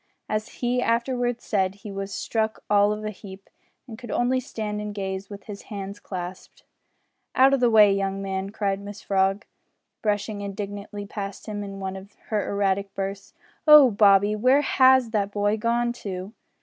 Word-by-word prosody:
As 215 0 -2 0.2
he 245 +1 +1
afterwards 245 0 0
said, 190 -2 0
he 205 +1 -9
was 195 0 -5
struck 220 +2 -2
all 205 0 +5
of 210 0 -4
a 215 - -2
heap, 195 -1 -12 0.4
and 225 -2 -9
could 245 - -10
only 250 +2 +1
stand 215 -4 -4
and 210 -1 -6
gaze 195 -1 -4
with 200 -1 -9
his 205 -2 -8
hands 200 -1 -6
clasped. 180 -1 -8 0.7
"Out 265 +1 +6
o' - - +4
the 245 -2 +3
way, 210 -3 +6
young 195 0 -1
man!" 195 0 -3
cried 200 -2 -2
Mrs 205 0 -9
Frog, 195 +2 +1 0.6
brushing 210 0 -1
indignantly 205 +1 -6
past 200 -1 -6
him, 205 -2 -4
in 195 -1 -7
one 190 0 -4
of 195 +2 -11
her 210 -2 -1
erratic 200 -1 0
bursts. 195 0 -5 0.3
"Oh! 300 -4 +9
Bobby 205 0 +5
where 255 +6 +4
has 260 -3 +4
that 205 -2 0
boy 205 +1 +1
gone 235 +2 0
to?" 195 -3 -6
205 Hz, 175 wpm, -25 LUFS, 195-225 Hz, 0.7 s, Oh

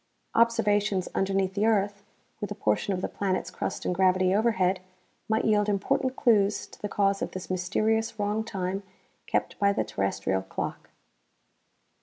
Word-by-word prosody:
Observations 210 -4 +2
underneath 195 -1 0
the 210 +3 +1
earth, 200 -2 +1 0.4
with 205 - -4
a 205 - -4
portion 110 - 0
of 185 -1 -1
the - - +1
planet's 190 -2 -2
crust - - -4
and - - +1
gravity 185 0 +3
overhead, 195 -4 +2 0.5
might 220 0 +1
yield 210 -1 +3
important 255 +6 0
clues 215 -6 +3
to - - -17
the 205 - -3
cause 195 -1 +1
of - - -1
this 185 0 -6
mysterious 215 +5 0
wrong 210 +1 0
time 195 -3 -3 0.5
kept - - -1
by 200 -1 +4
the 200 - 0
terrestrial 95 -2 -1
clock. 95 - -5
200 Hz, 155 wpm, -27 LUFS, 185-215 Hz, 0.5 s, by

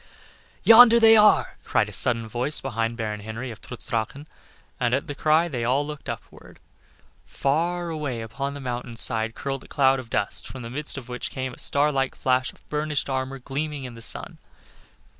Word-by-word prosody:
"Yonder 235 0 +9
they 225 -1 +8
are," 210 -1 +4
cried - - +1
a - - -8
sudden 115 -2 -1
voice 125 +7 -1
behind 115 -3 -2
Baron 105 -2 -3
Henry 110 +4 -6
of 110 - -11
Trutz 125 - -9
Drachen, 120 +4 -3 0.5
and 120 0 +2
at 140 - -2
the 145 - -5
cry 155 +3 +3 0.2
all 130 +5 +1
looked 150 -1 -7
upward. - - -9 0.6
Far 170 +5 -1
away 145 -7 -3
upon 135 +6 -4
the - - -6
mountain 125 -2 -5
side 115 -1 0
curled 135 -1 -4
a - - -15
cloud 135 -1 +3
of 125 -3 -9
dust, 100 - -2
from 130 -2 -8
the 115 - -7
midst 150 +2 0
of 130 -3 -7
which 125 0 -4
came 130 -1 -4
the - - -12
star 145 +1 +2
like 135 -2 -1
flash 130 0 +1
of - - -26
burnished 150 -2 -1
armor 130 0 -2
gleaming 140 +2 -4
in 125 -2 -7
the 115 - -11
sun. - - -3
135 Hz, 190 wpm, -25 LUFS, 120-150 Hz, 0.6 s, Yonder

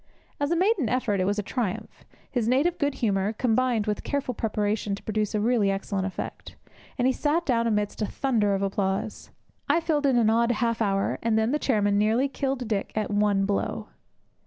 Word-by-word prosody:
As 285 0 0
a 340 - +2
maiden 365 - +2
effort 235 -6 0
it 185 - +1
was 205 +1 0
a 210 - -1
triumph; 215 -3 -4 0.3
his 240 -4 0
native 285 +8 +2
good 285 -2 0
humour 200 0 +1
combined 235 -1 +1
with 210 -1 -2
careful 280 -3 -2
preparation 210 -2 -1
to - - -13
produce 215 -1 -1
a - - +1
really 220 -2 +2
excellent 195 0 -2
effect; 190 - -7 0.4
and 245 - +1
he 260 - +3
sat 310 +6 0
down 235 -3 +1
amidst 210 -1 -1
a 210 - +1
thunder 220 -7 +1
of 195 - -2
applause. 195 +1 -2 0.4
I 330 - +4
filled 305 -4 +1
in 260 -3 +3
an 220 -2 +4
odd 235 +1 +3
half 230 0 -1
hour, 195 -2 0
and 225 -1 +1
then 220 +2 +2
the 300 - +1
chairman 205 -7 +2
nearly 225 +6 +2
killed 270 -3 -3
Dick 210 -3 -2
at 215 -1 -1
one 205 -1 +2
blow. 200 0 -2
220 Hz, 200 wpm, -26 LUFS, 205-255 Hz, 0.4 s, I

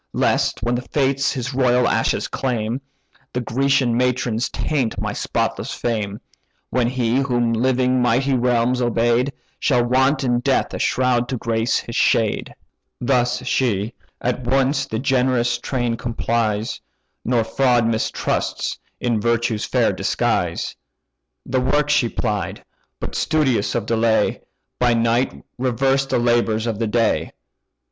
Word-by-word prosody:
Lest - - +1
when 120 - +1
the 120 - -1
Fates 135 +1 0
his 125 0 -4
royal 125 -1 +3
ashes - - +1
claim, 120 -1 -2 0.5
The 125 - -1
Grecian 130 +1 +1
matrons 125 -1 0
taint 135 -7 -1
my - - -2
spotless - - -2
fame; 105 -4 -2 0.5
When 125 -2 +2
he, 120 -1 0
whom 120 -4 +1
living 125 +1 +2
mighty 125 +3 +2
realms 125 0 +2
obey'd, 120 +2 +2 0.3
Shall 125 -4 +2
want 130 +4 +2
in 120 -2 +2
death 135 +1 0
a - - -4
shroud 125 -2 +1
to 130 - -2
grace 115 0 0
his 115 - -6
shade.' 110 -2 +1 0.5
"Thus 125 0 +1
she: 115 -4 0 0.3
at 125 +1 -2
once 135 +2 +1
the 110 - -3
generous 125 -2 +1
train 120 -3 -1
complies, 115 -2 -1 0.4
Nor 120 -2 +1
fraud 120 0 +2
mistrusts 115 -1 -1 0.2
in 115 -3 0
virtue's 115 -1 0
fair - - +2
disguise. - - -1 0.7
The 130 0 0
work 145 +3 +1
she 120 -5 +3
plied; 105 -5 -3 0.3
but, - - -5
studious 135 -10 +1
of 115 -3 -1
delay, 115 0 +1 0.4
By 120 -1 +3
night 115 +2 0 0.2
reversed 135 +2 +1
the - - +2
labours 120 -2 +1
of 110 -3 -2
the 115 - 0
day. 115 0 +1
120 Hz, 135 wpm, -21 LUFS, 115-130 Hz, 0.7 s, royal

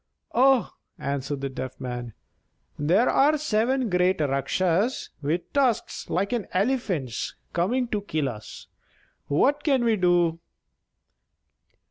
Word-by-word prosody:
"Oh!" 265 -1 +4 0.3
answered 140 0 -3
the 140 - -2
Deaf 130 -1 -6
Man, 120 -3 -5 0.7
"there 180 +11 +3
are 295 +3 +4
seven 260 -2 +1
great 180 -1 +2
Rakshas 165 - 0
with 155 +5 -2
tusks 260 -6 0
like 200 +5 0
an 230 -5 -2
elephant's 185 - -1 0.2
coming 240 +9 +1
to 210 -2 -1
kill 155 -7 -1
us! 110 -4 -8 0.6
What 280 - +2
can 270 -5 +2
we 225 -2 +3
do?" 175 -2 +2
180 Hz, 115 wpm, -25 LUFS, -, 0.7 s, Oh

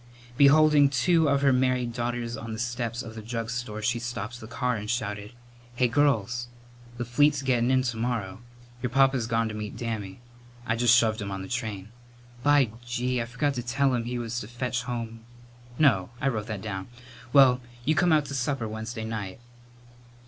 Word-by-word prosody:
Beholding 145 +1 +6
two 155 +4 +3
of 140 0 +2
her 135 -1 +5
married 125 -2 +1
daughters 120 0 -3
on 115 -1 -6
the - - -5
steps 120 0 -3
of 115 - -8
the 110 - -7
drug 115 +1 -4
store, 115 -3 -4
she 120 +2 +1
stopped 120 -1 -5
the 110 - -9
car 125 +1 -1
and 105 -1 -5
shouted: 105 -2 -3 0.4
"Hey, 125 0 +3
girls, 120 -3 +1 0.5
the 120 - -3
fleet's 145 +4 +3
gettin' 125 -2 +2
in 130 0 +3
to 125 -3 -2
morrow. 115 -4 -2 0.4
Your 125 - -1
papa's 135 -2 +3
gone 115 0 +1
to 110 - -5
meet 105 -1 -6
Dammy. 110 -4 -4 0.5
I 110 - 0
just 120 0 +5
shoved 110 -2 +2
him 100 - -4
on 95 -1 -4
the - - -7
train. 110 -5 -4 0.5
By 145 -4 +4
gee! 120 +1 -1
I - - -2
forgot 125 +4 -1
to 125 - -3
tell 130 +3 +1
him 120 -2 -1
he 125 +1 -3
was 120 0 -3
to 105 - -7
fetch 125 +1 -2
home 115 -2 -4 0.6
no, 115 -12 +3
I 135 - +1
wrote 110 -4 -3
that 105 -4 -5
down 95 -3 -5 0.4
well, 130 -2 +6 0.2
you 155 - +3
come 175 +2 +3
out 155 -2 +4
to 140 - -7
supper 135 -2 -1
Wednesday 110 +1 -5
night." 110 -3 -5
120 Hz, 190 wpm, -27 LUFS, 110-130 Hz, 0.6 s, Beholding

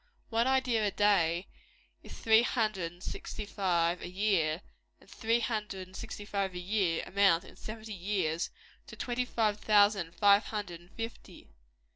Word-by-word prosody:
One 230 +2 +2
idea 255 -4 +2
a 205 - +2
day 190 -4 +2 0.6
is - - -11
three 220 0 +5
hundred 215 -8 0
and 175 +1 -16
sixty 215 - -5
five 175 -4 0
a - - -6
year; 180 -4 +1 0.4
and - - -21
three 230 +1 0
hundred 210 -5 -3
and 185 - -16
sixty 205 - -7
five 195 -3 -2
a - - -3
year, 180 -3 0
amount, 195 -3 +3
in - - -14
seventy 220 0 -8
years, 180 -4 -1 0.4
to - - -10
twenty 250 0 -2
five 215 -4 0
thousand 205 -5 +3
five 205 +1 +5
hundred 205 -6 -5
and 175 - -20
fifty. 225 - -8
205 Hz, 160 wpm, -31 LUFS, 180-220 Hz, 0.6 s, three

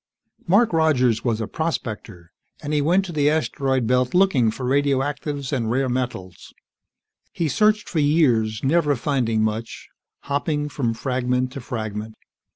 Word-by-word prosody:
_ - - -17
Mark 210 +3 +4
Rogers 130 -8 +2
was 115 -3 0
a 110 - -3
prospector, 110 - -5 0.3
and 145 - -3
he 150 - +2
went 180 +6 +2
to 180 - -6
the 150 -2 +2
asteroid 135 -4 0
belt 125 +4 +1
looking 180 -12 +4
for 125 +4 -5
radioactives 140 +1 -1
and 115 -5 -1
rare 130 +2 0
metals. 120 -8 -5 0.8
He 165 - -1
searched 210 +8 +2
for 165 - -2
years, 125 -8 +2
never 150 +1 +2
finding 115 -4 0
much, 110 +1 -4 0.3
hopping 145 +1 -2
from 120 -6 -2
fragment 125 0 -1
to 135 0 -7
fragment. 110 -2 -5
130 Hz, 150 wpm, -22 LUFS, 115-150 Hz, 0.8 s, Mark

